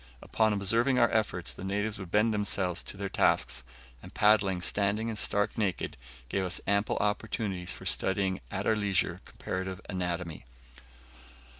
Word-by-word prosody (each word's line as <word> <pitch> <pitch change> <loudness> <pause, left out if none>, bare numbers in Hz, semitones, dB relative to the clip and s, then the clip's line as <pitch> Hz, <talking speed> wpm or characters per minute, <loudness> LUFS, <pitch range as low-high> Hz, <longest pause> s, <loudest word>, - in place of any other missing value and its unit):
Upon 110 -1 +2
observing 115 +6 +2
our 120 -2 +4
efforts, 105 -5 0
the - - -9
natives 105 +2 -2
would 95 -3 -7
bend 105 +4 +3
themselves 95 -4 0
to - - -7
their 100 0 -3
tasks, 65 -7 +1 0.4
and - - -11
paddling 100 -3 +4
standing 100 +4 0
and 110 - -3
stark 105 0 +1
naked, 100 -4 -1 0.3
give 95 +9 -1
us 90 -1 -3
ample 100 +1 +1
opportunities 105 -3 -1
for - - -8
studying 95 -1 +1
at 100 0 -3
our 110 - +3
leisure 100 -3 0
comparative 95 0 -4
anatomy. 90 -5 -3
100 Hz, 150 wpm, -30 LUFS, 95-105 Hz, 0.4 s, our